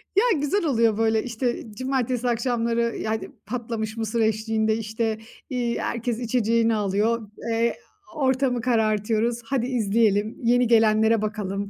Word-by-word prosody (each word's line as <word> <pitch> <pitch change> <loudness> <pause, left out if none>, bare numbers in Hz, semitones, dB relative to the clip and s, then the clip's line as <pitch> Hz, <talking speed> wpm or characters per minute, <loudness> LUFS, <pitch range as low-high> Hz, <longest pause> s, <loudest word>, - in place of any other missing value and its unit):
Ya, 415 - +3
güzel 330 +5 0
oluyor, 230 -6 +2
böyle, 220 -1 +2
işte, 240 0 -2
cumartesi 255 -2 -1
akşamları, 235 -1 0
yani, 220 0 -3 0.2
patlamış 230 -2 -4
mısır 225 +1 -1
eşliğinde, 220 0 +1
işte, 220 0 -2 0.3
iii, 240 -2 -1
herkes 235 0 -2
içeceğini 230 -1 +1
alıyor, 210 +2 0 0.2
eee, 230 +1 +1 0.4
ortamı 260 -3 +1
karartıyoruz. 225 0 +1
"Hadi 255 -1 -1
izleyelim, 215 -3 +1
yeni 245 +1 +3
gelenlere 220 -1 +4
bakalım. 200 -2 -3
230 Hz, 125 wpm, -24 LUFS, 220-245 Hz, 0.4 s, gelenlere